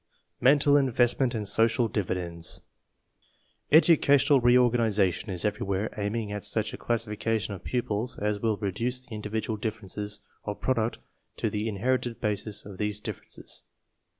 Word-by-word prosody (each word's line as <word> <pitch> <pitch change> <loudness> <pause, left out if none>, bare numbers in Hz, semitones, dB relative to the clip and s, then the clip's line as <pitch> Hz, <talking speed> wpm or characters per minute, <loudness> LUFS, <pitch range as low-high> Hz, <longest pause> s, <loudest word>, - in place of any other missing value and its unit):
MENTAL 145 +2 +5
INVESTMENT 125 -1 +2
AND 105 -2 -3
SOCIAL 115 +3 +3
DIVIDENDS 90 -5 -1 1.1
Educational 145 -3 +6
reorganization 115 -6 +3
is 90 -1 -2
everywhere 105 0 -1
aiming 105 +1 -2
at 105 -1 -4
such 110 -1 -1
a - - -5
classification 115 -2 -1
of 95 - -9
pupils 120 -1 -2
as 105 0 -1
will 110 -1 0
reduce 115 +6 -2
the 115 - -8
individ 105 +1 -3
ual 110 -2 -4
differences 105 -2 -4 0.2
of 105 -1 -5
product 115 -3 0 0.4
to - - -1
the 105 +2 -1
inherited 120 +3 -1
bases 105 -1 -2
of 100 -2 -10
these 105 0 0
differences. - - -7
110 Hz, 135 wpm, -28 LUFS, 105-120 Hz, 1.1 s, Educational